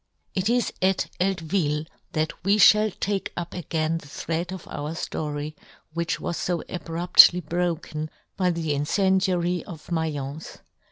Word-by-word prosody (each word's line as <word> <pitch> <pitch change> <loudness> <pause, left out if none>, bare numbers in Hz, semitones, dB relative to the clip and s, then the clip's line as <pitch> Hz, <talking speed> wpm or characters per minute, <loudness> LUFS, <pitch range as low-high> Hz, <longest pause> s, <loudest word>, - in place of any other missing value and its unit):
It 190 +2 0
is 245 0 +1
at 190 0 +1
Eltvil 165 -4 0 0.3
that 155 +1 -2
we 200 +3 +3
fhall 215 +1 +6
take 200 -1 -1
up 175 -1 -4
again 165 -1 -1
the 145 - -14
thread 165 +4 -3
of 190 -2 -7
our 150 +2 -4
ftory, 150 -2 -4 0.4
which 170 0 -1
was 170 - -3
fo 175 -2 -1
abruptly 175 +1 +6
broken 165 -2 -2 0.3
by 185 -1 +2
the 165 -3 -1
incendiary 180 +3 +1
of 165 -4 -10
Mai'ence. 155 -3 -3
170 Hz, 135 wpm, -25 LUFS, 155-185 Hz, 0.4 s, fhall